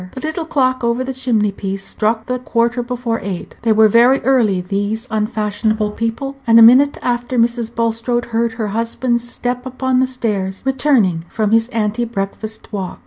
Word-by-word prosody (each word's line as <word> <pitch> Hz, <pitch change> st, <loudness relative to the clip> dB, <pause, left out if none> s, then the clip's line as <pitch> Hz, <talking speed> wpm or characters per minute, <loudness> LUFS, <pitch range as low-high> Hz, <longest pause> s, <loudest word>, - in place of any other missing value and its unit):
The -, -, -7 dB
little 315 Hz, +2 st, -3 dB
clock 255 Hz, -4 st, +1 dB
over 235 Hz, +2 st, 0 dB
the 265 Hz, +1 st, -4 dB
chimney 235 Hz, -5 st, 0 dB
piece 195 Hz, 0 st, -5 dB
struck 220 Hz, +1 st, -1 dB
the 250 Hz, 0 st, -2 dB
quarter 235 Hz, 0 st, 0 dB
before 240 Hz, -1 st, -3 dB
eight; 190 Hz, -3 st, -6 dB
they 230 Hz, -1 st, +1 dB
were 220 Hz, 0 st, +6 dB
very 240 Hz, +5 st, +5 dB
early, 230 Hz, -7 st, +2 dB
these 205 Hz, +5 st, -2 dB
unfashionable 215 Hz, 0 st, -1 dB
people; 230 Hz, +6 st, -4 dB
and 230 Hz, 0 st, +6 dB
a 230 Hz, -, +9 dB
minute 265 Hz, +5 st, +6 dB
afterward 240 Hz, -1 st, +1 dB
Mrs. 235 Hz, -1 st, -6 dB
Bulstrode 230 Hz, +1 st, -1 dB
heard 230 Hz, 0 st, +1 dB
her 220 Hz, -2 st, -3 dB
husband's 235 Hz, +2 st, -1 dB
step 250 Hz, 0 st, -3 dB
upon 260 Hz, 0 st, -1 dB
the 260 Hz, -, +2 dB
stairs, 205 Hz, -7 st, -3 dB
returning 250 Hz, -, +1 dB
from 215 Hz, -2 st, -1 dB
his 225 Hz, 0 st, +3 dB
ante 225 Hz, -1 st, -1 dB
breakfast 220 Hz, 0 st, -5 dB
walk. 190 Hz, -3 st, -4 dB
230 Hz, 175 wpm, -17 LUFS, 215-250 Hz, -, a